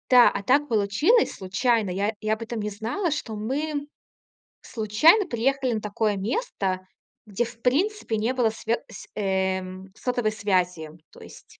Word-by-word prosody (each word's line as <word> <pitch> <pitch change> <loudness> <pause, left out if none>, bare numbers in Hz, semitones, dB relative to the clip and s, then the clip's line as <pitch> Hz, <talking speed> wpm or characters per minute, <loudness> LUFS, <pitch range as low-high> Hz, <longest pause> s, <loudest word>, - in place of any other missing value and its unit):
Да, 250 -1 +8
а 200 - -4
так 280 +7 +3
получилось 230 - +2
случайно. 210 +3 0
Я 200 +4 -1
я 215 0 +1
об 220 - -4
этом 230 0 -4
не 210 0 -2
знала, 230 - -2
что 250 -6 -3
мы 285 +7 -3 0.7
случайно 255 - +4
приехали 260 0 0
на 215 - -2
такое 210 0 -1
место, 195 - -2 0.4
где 210 +2 -1
в 235 0 -9
принципе 285 - 0
не 225 +4 0
было 245 -3 +2
свёт 225 +1 -2
св 220 - -11
э, 190 -2 0 0.3
сотовой 245 -3 -1
связи. 180 -6 0 0.2
То - - -16
есть, - - -15
225 Hz, 155 wpm, -25 LUFS, 205-255 Hz, 0.7 s, Да